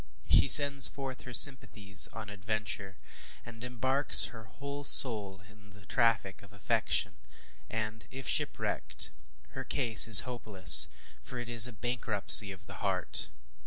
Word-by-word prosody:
She - - -2
sends 145 -2 +1
forth 135 -2 -13
her 125 - -14
sympathies 105 -7 +1
on 110 -1 -15
adventure; 100 -1 -11 0.5
she 120 - -15 0.2
embarks 130 +3 +3
her 110 -1 -17
whole 140 +3 -14
soul 105 -9 +1
in 105 0 -25
the 100 -1 -22
traffic 115 -5 -6
of 100 - -23
affection; 100 -1 -7 0.5
and 110 -1 -11
if 135 0 -13
shipwrecked, - - -6 0.4
her - - -13
case 115 -7 +4
is 110 -4 +8
hopeless 110 -7 +4 0.3
for 125 - -14
it 120 -1 -12
is 120 -1 +7
a 125 - -13
bankruptcy 110 -3 0
of 95 -1 -18
the - - -17
heart. - - -8
110 Hz, 140 wpm, -25 LUFS, 105-125 Hz, 0.5 s, is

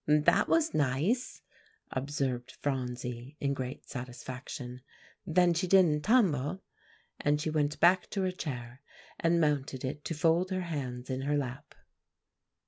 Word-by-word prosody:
"That 150 0 +4
was 325 -1 +3
nice," 155 - 0 0.5
observed 130 -2 -2
Phronsie 125 0 -3
in 140 -1 0
great 130 -1 -5
satisfaction, 125 0 -7 0.5
"then 175 +1 +4
she 170 +3 0
didn't 175 -5 +5
tumble;" 185 - +2 0.6
and 145 0 +2
she 155 +1 -1
went 150 -1 0
back 180 +2 +5
to 195 - -1
her 185 - +1
chair, 125 -7 -6 0.4
and 170 +1 +3
mounted 140 -4 0
it 145 +3 -4
to 165 - -2
fold 165 +3 +3
her 185 -1 -1
hands 130 -7 -4
in 130 0 -2
her 145 +2 +1
lap. 130 -3 -5
145 Hz, 135 wpm, -31 LUFS, 130-170 Hz, 0.6 s, didn't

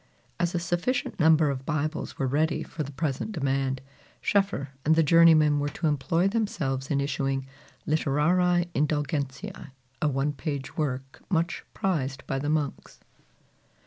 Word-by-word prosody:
As 175 0 0
a - - +2
sufficient 175 +10 -1
number 155 -2 +5
of 135 -1 -5
Bibles 155 +2 -2
were 135 - 0
ready 150 +5 +1
for 160 - -6
the 145 -1 -4
present 145 +8 -2
demand, 135 -4 0 0.4
Schoeffer 195 -9 +1
and 160 +2 +4
the 165 - +4
journeymen 155 -2 +6
were 145 0 0
to 165 - -5
employ 155 +5 +2
themselves 150 - -1
in 140 - +1
issuing 135 -1 -1 0.4
"Litterariæ 170 +4 +2
Indulgentiæ," 145 +4 -2 0.3
a 150 - +3
one 140 +1 0
page 140 -1 -4
work 135 -3 -3
much 170 -2 0
prized 140 -8 -1
by 135 - -2
the 145 +2 -2
monks. 150 -2 -2
150 Hz, 145 wpm, -27 LUFS, 135-165 Hz, 0.4 s, journeymen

